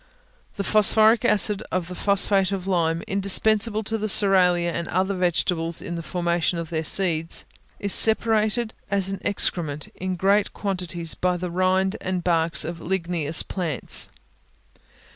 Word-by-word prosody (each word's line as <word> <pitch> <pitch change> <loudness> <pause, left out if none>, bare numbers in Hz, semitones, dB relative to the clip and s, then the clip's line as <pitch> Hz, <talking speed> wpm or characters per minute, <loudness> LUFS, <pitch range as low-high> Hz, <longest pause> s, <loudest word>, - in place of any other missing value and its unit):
The 200 - -4
phosphoric 220 +2 +4
acid 210 -3 +2
of 180 -2 -2
the 180 - -8
phosphate 200 0 0
of 190 -2 -4
lime, 165 -3 -1
indispensable 210 +3 +1
to 220 +1 -3
the 215 - -2
cerealia 180 -4 +3
and 170 0 -5
other 190 +2 -1
vegetables 175 -2 -1
in 170 - -7
the 170 - -5
formation 170 0 -2
of 170 0 -6
their 160 -1 -2
seeds, 165 -2 +3 0.3
is 200 -1 +1
separated 220 0 +4 0.2
as 195 -1 0
an 195 - -5
excrement, 155 -7 -2
in 185 0 -5
great 200 +3 +1
quantities, 180 -4 -4
by 180 0 -1
the 180 0 -5
rind 185 +2 0
and 185 -1 -3
barks 165 -1 +1
of 165 +1 -6
ligneous 170 -4 -1
plants. 165 - -2
185 Hz, 145 wpm, -23 LUFS, 170-200 Hz, 0.3 s, phosphoric